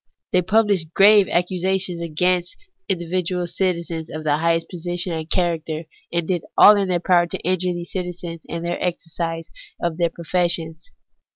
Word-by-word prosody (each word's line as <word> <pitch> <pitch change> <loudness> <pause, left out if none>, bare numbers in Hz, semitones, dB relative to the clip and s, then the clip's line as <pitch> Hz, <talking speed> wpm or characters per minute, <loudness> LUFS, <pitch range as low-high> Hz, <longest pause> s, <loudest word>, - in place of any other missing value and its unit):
They 180 - +4
published 200 -4 +1
grave 205 -1 +6
accusations 180 0 0
against 175 +2 0 0.3
individual 180 0 -1
citizens 170 -3 -2
of 155 0 -6
the 150 -1 +2
highest 165 +1 +1
position 175 +1 -4
and 160 0 -5
character, 165 -3 -1 0.3
and 170 -1 -1
did 180 -3 -1
all 210 - +9
in 200 -1 +1
their 180 -1 +1
power 175 -1 +3
to - - -4
injure 185 +1 0
these 175 0 -7
citizens 175 -2 -5
in 170 0 -5
the 175 0 -3
exercise 165 -1 -3 0.3
of 170 -2 -2
their 170 -1 +2
professions. 170 -1 -1
175 Hz, 155 wpm, -22 LUFS, 165-180 Hz, 0.3 s, all